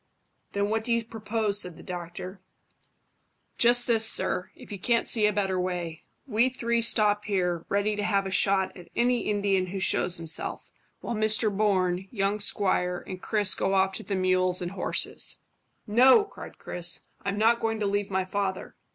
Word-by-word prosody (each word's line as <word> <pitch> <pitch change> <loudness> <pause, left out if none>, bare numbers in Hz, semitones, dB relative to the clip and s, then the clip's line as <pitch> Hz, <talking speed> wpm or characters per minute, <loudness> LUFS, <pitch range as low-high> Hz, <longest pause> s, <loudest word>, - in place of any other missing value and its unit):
"Then 200 +1 -1
what 220 0 0
do 235 - -3
you 230 -1 -2
propose?" 215 -2 -1
said 180 -3 -7
the - - -13
doctor. 180 +1 -7 1.2
"Just 240 +1 +5
this, 225 -2 +3
sir, 185 -4 +3
if - - -14
you 200 - -6
can't 235 +4 +1
see 215 -3 +3
a - - +2
better 190 -2 -1
way. 175 -3 -4 0.2
We 240 -1 +2
three 235 -2 -1
stop 210 -2 +3
here, 180 -4 -1
ready 205 +1 0
to 205 - -3
have 200 -2 +1
a 190 - -4
shot 190 0 +2
at 175 -2 -13
any 245 -1 +1
Indian 200 -3 +1
who 190 +2 -5
shows 180 -1 +1
himself, 165 -1 -1 0.3
while 240 - -4
Mr 215 -1 +2
Bourne, 190 -3 +1
young 200 -1 -1
squire, 185 -3 +1
and 185 -1 -8
Chris 210 -3 +1
go 195 - -1
off 190 0 +2
to - - -5
the 200 - -3
mules 185 -1 +1
and 175 -1 -4
horses." 195 -2 -1 0.4
"No," 255 - +6
cried 405 - -11
Chris; 175 0 -4 0.2
"I'm 200 0 -2
not 230 +2 +3
going 225 -1 -2
to 210 - -1
leave 200 0 -1
my 190 -1 -1
father." 190 -1 -3
200 Hz, 180 wpm, -27 LUFS, 185-220 Hz, 1.2 s, No